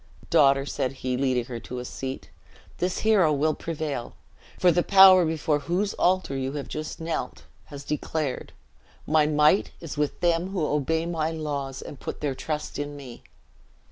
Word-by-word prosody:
"Daughter," 135 Hz, -1 st, +5 dB
said 130 Hz, -2 st, -2 dB
he, 125 Hz, -1 st, 0 dB
leading 130 Hz, -2 st, 0 dB
her 120 Hz, -1 st, -6 dB
to 125 Hz, -, -8 dB
a 125 Hz, -, -5 dB
seat, 130 Hz, +1 st, -6 dB, 0.5 s
"this 180 Hz, +1 st, -1 dB
hero 200 Hz, -8 st, +4 dB
will 150 Hz, +2 st, +1 dB
prevail; 150 Hz, -7 st, -5 dB, 0.4 s
for 180 Hz, -, +4 dB
the 175 Hz, +1 st, +2 dB
Power 190 Hz, -1 st, +7 dB
before 155 Hz, -2 st, 0 dB
whose 185 Hz, +7 st, -1 dB
altar 185 Hz, -6 st, +1 dB
you 135 Hz, 0 st, -3 dB
have 145 Hz, -2 st, -5 dB
just 155 Hz, 0 st, -6 dB
knelt, 165 Hz, 0 st, -4 dB, 0.2 s
has 145 Hz, -1 st, -9 dB
declared, 150 Hz, -1 st, -3 dB, 0.5 s
'My 155 Hz, -1 st, +3 dB
might 150 Hz, +5 st, +3 dB
is 160 Hz, -3 st, -7 dB
with 150 Hz, -1 st, -1 dB
them 170 Hz, 0 st, +2 dB
who 185 Hz, -5 st, -1 dB
obey 155 Hz, +3 st, 0 dB
my 160 Hz, -2 st, -1 dB
laws, 145 Hz, -4 st, -4 dB
and 140 Hz, -, -10 dB
put -, -, -6 dB
their 145 Hz, -2 st, -1 dB
trust 150 Hz, +3 st, -4 dB
in 145 Hz, 0 st, -4 dB
me!' 130 Hz, -4 st, -10 dB
150 Hz, 170 wpm, -26 LUFS, 140-165 Hz, 0.5 s, Power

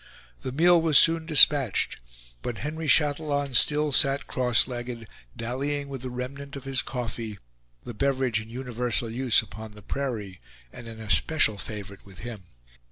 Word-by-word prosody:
The -, -, -5 dB
meal 170 Hz, +5 st, +4 dB
was 160 Hz, -3 st, +4 dB
soon 165 Hz, -1 st, +6 dB
dispatched; 145 Hz, -, +4 dB, 0.4 s
but 120 Hz, -2 st, -5 dB
Henry 155 Hz, +2 st, -5 dB
Chatillon 145 Hz, -1 st, +1 dB
still 150 Hz, +4 st, +4 dB
sat 140 Hz, 0 st, +3 dB
cross 125 Hz, -3 st, +2 dB
legged, 120 Hz, -2 st, -6 dB, 0.3 s
dallying 140 Hz, +4 st, -3 dB
with 135 Hz, -2 st, -7 dB
the 130 Hz, -, -5 dB
remnant 140 Hz, +3 st, -7 dB
of 135 Hz, -, -8 dB
his 135 Hz, -2 st, -1 dB
coffee, 115 Hz, -4 st, -5 dB, 0.5 s
the 120 Hz, -, -8 dB
beverage 130 Hz, -2 st, 0 dB
in 110 Hz, -, -12 dB
universal 120 Hz, -1 st, -2 dB
use 125 Hz, -1 st, +2 dB
upon 110 Hz, 0 st, -10 dB
the 105 Hz, -1 st, -14 dB
prairie, 110 Hz, -10 st, -5 dB, 0.3 s
and 120 Hz, -, -10 dB
an 115 Hz, -1 st, -10 dB
especial 110 Hz, 0 st, +2 dB
favorite 100 Hz, -2 st, -7 dB
with 100 Hz, -2 st, -15 dB
him. 110 Hz, -4 st, -8 dB
125 Hz, 155 wpm, -26 LUFS, 115-140 Hz, 0.5 s, soon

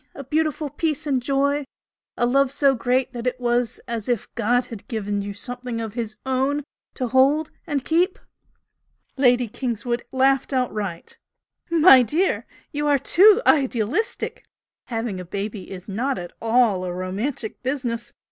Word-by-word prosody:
a 280 Hz, -, -7 dB
beautiful 305 Hz, +2 st, 0 dB
peace 310 Hz, 0 st, -1 dB
and 270 Hz, -4 st, +1 dB
joy? 280 Hz, +2 st, +1 dB, 0.5 s
a 240 Hz, -, +2 dB
love 270 Hz, +2 st, +3 dB
so 280 Hz, -1 st, +3 dB
great 250 Hz, +1 st, 0 dB
that 240 Hz, 0 st, -4 dB
it 250 Hz, 0 st, -1 dB
was 240 Hz, -1 st, 0 dB
as 230 Hz, -1 st, -4 dB
if 240 Hz, -4 st, 0 dB
God 240 Hz, +2 st, +1 dB
had 225 Hz, -4 st, -10 dB
given 205 Hz, -5 st, -2 dB
you 200 Hz, 0 st, -5 dB
something 245 Hz, +2 st, -5 dB
of 225 Hz, -2 st, -4 dB
His 225 Hz, -3 st, -4 dB
Own 265 Hz, +3 st, 0 dB, 0.3 s
to 255 Hz, -3 st, -2 dB
hold 280 Hz, +5 st, +3 dB, 0.2 s
and 280 Hz, -4 st, -2 dB
keep?" 340 Hz, +8 st, +2 dB, 1.0 s
Lady 250 Hz, -2 st, +3 dB
Kingswood 240 Hz, +1 st, -3 dB
laughed 270 Hz, +1 st, +2 dB
outright. 210 Hz, -9 st, -3 dB, 0.5 s
"My 325 Hz, -5 st, +8 dB
dear 315 Hz, -, +2 dB
girl, -, -, -8 dB, 0.3 s
you 295 Hz, 0 st, -1 dB
are 290 Hz, -1 st, +4 dB
too 405 Hz, -, +5 dB
idealistic! 270 Hz, -, +1 dB, 0.4 s
Having 225 Hz, -5 st, -3 dB
a -, -, -5 dB
baby 200 Hz, +2 st, -5 dB
is 185 Hz, -1 st, -9 dB
not 245 Hz, +7 st, -1 dB
at 175 Hz, 0 st, -7 dB
all 225 Hz, -5 st, +3 dB
a 180 Hz, -, -3 dB
romantic 200 Hz, +7 st, -4 dB
business! 250 Hz, -3 st, -3 dB
250 Hz, 155 wpm, -23 LUFS, 225-280 Hz, 1.0 s, My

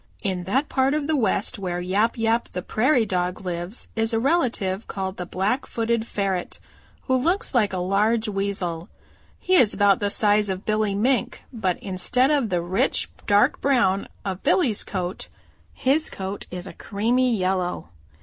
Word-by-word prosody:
"In 185 Hz, -3 st, -2 dB
that 265 Hz, -, +1 dB
part 265 Hz, +2 st, +1 dB
of 305 Hz, -2 st, -1 dB
the 315 Hz, +1 st, +1 dB
West 215 Hz, -4 st, 0 dB
where 180 Hz, -2 st, -3 dB
Yap 200 Hz, +7 st, 0 dB
Yap 230 Hz, +1 st, +1 dB
the 180 Hz, -, -4 dB
Prairie 240 Hz, +3 st, +2 dB
Dog 180 Hz, -2 st, -2 dB
lives 180 Hz, +3 st, -5 dB
is 225 Hz, +1 st, 0 dB
a 225 Hz, -, +2 dB
relative 230 Hz, -, 0 dB
called 190 Hz, 0 st, -4 dB
the 180 Hz, -, -5 dB
Blackfooted 230 Hz, +3 st, -1 dB
Ferret 195 Hz, -3 st, -2 dB, 0.5 s
who 260 Hz, -, -1 dB
looks 340 Hz, -, +1 dB
like 225 Hz, -5 st, +3 dB
a 190 Hz, -, -3 dB
large 210 Hz, +5 st, +1 dB
Weasel. 195 Hz, -4 st, -2 dB, 0.5 s
He 370 Hz, -, -1 dB
is 250 Hz, -, +5 dB
about 200 Hz, -2 st, +4 dB
the 205 Hz, -, 0 dB
size 210 Hz, 0 st, +2 dB
of 190 Hz, +1 st, -4 dB
Billy 215 Hz, -2 st, 0 dB
Mink, 245 Hz, +5 st, 0 dB
but 190 Hz, -6 st, -1 dB
instead 225 Hz, +8 st, +2 dB
of 280 Hz, -7 st, +1 dB
the 180 Hz, -2 st, 0 dB
rich 175 Hz, +3 st, 0 dB, 0.2 s
dark 205 Hz, 0 st, +3 dB
brown 235 Hz, -8 st, +2 dB, 0.2 s
of 190 Hz, -1 st, -3 dB
Billy's 250 Hz, -, +2 dB
coat 185 Hz, -1 st, -4 dB, 0.4 s
his 290 Hz, +5 st, +1 dB
coat 195 Hz, +1 st, -6 dB
is 180 Hz, 0 st, -6 dB
a -, -, -8 dB
creamy 235 Hz, +4 st, 0 dB
yellow. 185 Hz, -, -1 dB
205 Hz, 165 wpm, -24 LUFS, 185-240 Hz, 0.5 s, is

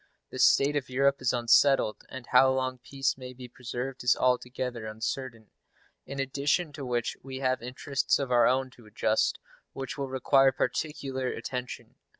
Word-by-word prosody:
The -, -, -7 dB
state 140 Hz, +2 st, +4 dB
of 140 Hz, -3 st, -2 dB
Europe 140 Hz, +2 st, +2 dB
is 130 Hz, -, +2 dB
unsettled, 120 Hz, -1 st, +3 dB
and 130 Hz, -2 st, -8 dB
how 130 Hz, +2 st, +5 dB
long 130 Hz, -1 st, -1 dB
peace 135 Hz, +1 st, -2 dB
may 125 Hz, 0 st, -8 dB
be 125 Hz, 0 st, -10 dB
preserved 125 Hz, +2 st, -6 dB
is 125 Hz, -, +4 dB
altogether 125 Hz, -2 st, -1 dB
uncertain; 110 Hz, +1 st, -5 dB, 0.6 s
in 140 Hz, 0 st, -6 dB
addition 140 Hz, +4 st, 0 dB
to 140 Hz, -, -7 dB
which 120 Hz, -2 st, -2 dB
we 135 Hz, 0 st, -7 dB
have 130 Hz, -2 st, 0 dB
interests 130 Hz, +3 st, -1 dB
of 135 Hz, -3 st, -3 dB
our 120 Hz, -1 st, +5 dB
own 130 Hz, 0 st, +1 dB
to 120 Hz, -3 st, -18 dB
adjust 105 Hz, -, +1 dB, 0.4 s
which 135 Hz, +1 st, -6 dB
will 135 Hz, -1 st, -3 dB
require 135 Hz, +1 st, +4 dB
particular 135 Hz, -1 st, -2 dB
attention. 125 Hz, -1 st, -6 dB
130 Hz, 160 wpm, -28 LUFS, 125-135 Hz, 0.6 s, how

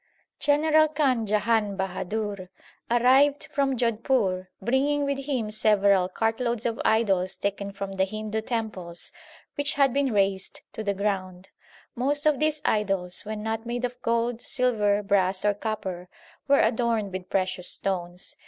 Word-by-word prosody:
General 310 Hz, +1 st, +4 dB
Khan 270 Hz, -7 st, +1 dB
Jahan 210 Hz, -1 st, +1 dB
Bahadur 190 Hz, +1 st, -3 dB, 0.4 s
arrived 260 Hz, +5 st, +4 dB
from 275 Hz, -2 st, +1 dB
Jodhpur 225 Hz, -5 st, 0 dB
bringing 285 Hz, +4 st, +1 dB
with 275 Hz, 0 st, -3 dB
him 240 Hz, -7 st, -1 dB
several 200 Hz, -3 st, +3 dB
cartloads 225 Hz, +3 st, -1 dB
of 230 Hz, -1 st, -1 dB
idols 195 Hz, -5 st, +2 dB
taken 200 Hz, 0 st, -3 dB
from 195 Hz, 0 st, -6 dB
the 190 Hz, 0 st, +1 dB
Hindu 215 Hz, +2 st, -4 dB
temples 215 Hz, -7 st, -3 dB, 0.4 s
which 285 Hz, +1 st, -1 dB
had 275 Hz, -3 st, +3 dB
been 280 Hz, -2 st, +1 dB
razed 195 Hz, -2 st, 0 dB
to 220 Hz, -, -5 dB
the 200 Hz, -1 st, -1 dB
ground. 190 Hz, -2 st, -3 dB, 0.4 s
Most 285 Hz, +5 st, 0 dB
of 300 Hz, -3 st, +3 dB
these 305 Hz, 0 st, 0 dB
idols, 195 Hz, -4 st, 0 dB
when 215 Hz, 0 st, -5 dB
not 225 Hz, +1 st, -3 dB
made 245 Hz, +1 st, -2 dB
of 245 Hz, 0 st, -7 dB
gold, 235 Hz, 0 st, 0 dB
silver, 210 Hz, -5 st, +1 dB
brass, 195 Hz, -1 st, +2 dB
or 205 Hz, -, +4 dB
copper, 190 Hz, -4 st, -5 dB, 0.4 s
were 280 Hz, 0 st, +5 dB
adorned 225 Hz, -4 st, +1 dB
with 185 Hz, 0 st, -6 dB
precious 185 Hz, -1 st, -1 dB
stones. 180 Hz, -1 st, -2 dB
215 Hz, 145 wpm, -26 LUFS, 195-250 Hz, 0.4 s, were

